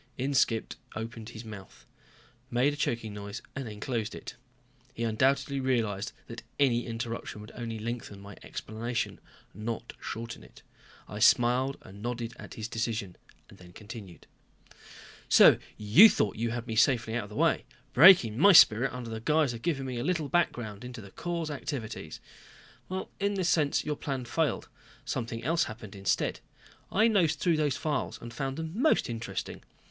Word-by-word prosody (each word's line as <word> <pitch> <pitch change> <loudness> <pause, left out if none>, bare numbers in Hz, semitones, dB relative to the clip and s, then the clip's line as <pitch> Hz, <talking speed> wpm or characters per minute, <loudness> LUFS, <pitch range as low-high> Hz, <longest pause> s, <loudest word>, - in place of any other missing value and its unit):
Inskipp 130 -4 +1 0.2
opened 110 0 -6
his 115 -1 -9
mouth, 105 -3 -11 0.6
made 125 +4 +2
a - - -5
choking 115 -6 -2
noise, 100 +1 -6
then 115 -6 -6
closed 115 -1 -3
it. - - -8 0.6
He 115 - -3
undoubtedly 135 +5 +1
realized 115 -6 0
that 115 0 -8 0.2
any 125 -4 +2
interruption 115 -2 -5
would 105 +1 -10
only 115 -2 -5
lengthen 110 -2 -5
my 100 0 -11
explanation, 115 +2 -4 0.3
not 115 +3 -5
shorten 115 - -6
it. - - -17 0.4
I 105 - -7
smiled 125 +4 +4
and 100 +2 -12
nodded 120 0 -4
at - - -10
his 110 -1 -4
decision, 110 -5 -3 0.3
then 90 -1 -15
continued. 105 -4 -10 1.0
"So - - +8 0.2
you 110 - +8
thought 105 - 0
you 115 +1 -1
had 120 0 -4
me 115 -2 -4
safely 115 -1 +3
out 115 -3 -1
of - - -13
the 105 - -10
way. - - +2 0.3
Breaking 130 - +7
my 200 +5 +8
spirit 125 -4 +7
under 125 -2 -6
the 110 - -4
guise 150 +2 +2
of 115 - -8
'giving 140 -4 -1
me 125 -2 -4
a - - -2
little 165 -4 -1
background 120 - -1
in 125 0 -7
the 105 -5 -10
Corps' 170 - -3
activities.' 135 -5 -5 1.0
In 200 0 0
this 185 -3 0
sense 150 -4 +2
your 150 -1 -2
plan 135 -3 -4
failed. 150 +2 -1 0.4
Something 115 0 -3
else 165 +5 +2
happened 110 -3 -9
instead. 100 -1 0 0.5
I 215 +3 +4
nosed 175 -9 +3
through 170 -1 +2
the 150 -1 +2
files 145 +3 -2
and 115 0 -9
found 135 -1 -3
them 160 0 -4
most 275 +8 +3
interesting. 115 -5 -5
120 Hz, 160 wpm, -29 LUFS, 110-140 Hz, 1.0 s, So